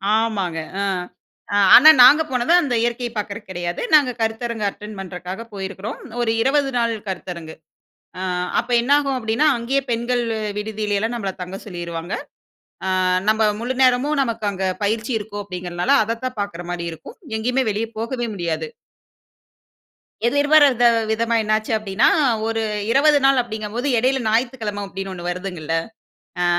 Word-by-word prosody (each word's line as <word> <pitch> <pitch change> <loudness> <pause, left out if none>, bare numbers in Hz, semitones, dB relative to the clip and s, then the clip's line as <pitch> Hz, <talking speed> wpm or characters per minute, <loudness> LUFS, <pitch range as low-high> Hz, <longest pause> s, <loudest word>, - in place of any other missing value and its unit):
ஆமாங்க. 200 -7 -1 0.2
அ - - 0 0.9
ஆனா 305 +5 +10
நாங்க 290 +5 +8
போனது 250 +6 +1
அந்த 275 -6 -2
இயற்கைய 240 0 -1
பார்க்குறக்கு 210 0 -5
கிடையாது. 175 -1 -4
நாங்க 290 -4 +6
கருத்தரங்க 225 0 -2
அட்டெண்ட் 210 +1 -10
பண்ணுறக்காக 185 +2 -6
போயிருக்கிறோம். 195 +2 -6 0.2
ஒரு 225 -1 +1
20 275 +2 +2
நாள் 235 -1 +1
கருத்தரங்கு. 175 -3 -6 0.7
அ - - -3 0.4
அப்ப 240 +1 -11
என்னாகும் 275 +1 +2
அப்படீன்னா, 230 +5 +1
அங்கேயே 255 +4 0
பெண்கள் 240 +1 0 0.4
விடுதியில 210 -1 -2
எல்லாம் 225 +3 -2
நம்பள 195 -4 -3
தங்க 185 +2 -6
சொல்லிருவாங்க. 170 -1 -5 0.7
ஆ - - 0 0.4
நம்ப 220 +1 +2 0.2
முழு 245 +3 -2
நேரமும் 260 +4 +2
நமக்கு 230 -4 -2
அங்க 190 -1 -3 0.2
பயிற்சி 220 +4 -1
இருக்கும் 205 -1 -6
அப்படிங்கிறனால, 180 +3 -3
அதைத்தான் 230 +1 -4
பார்க்குறமாரி 175 -3 -5
இருக்கும். 160 - -11 0.2
எங்கேயுமே 250 +4 0
வெளியே 220 +2 -3
போகவே 240 +1 -3
முடியாது. 160 -3 -3 1.6
எதிர்பாரத 285 -1 +4 0.3
விதமா 230 +1 0
என்ன 215 - -2
ஆச்சு 215 +1 -6
அப்படீன்னா, 210 +3 +1 0.4
ஒரு 225 0 -1 0.3
20 295 +3 +5
நாள் 270 -2 +5
அப்படிங்கும்போது, 220 +2 -4
இடையில 260 +3 +1
ஞாயித்துக்கிழமை 225 -2 -1
அப்படீன்னு 195 0 -6
ஒண்ணு 175 -1 -6
வருதுங்கல்ல. 175 -3 -4 0.7
அ - - +2
220 Hz, 135 wpm, -21 LUFS, 195-245 Hz, 1.6 s, ஆனா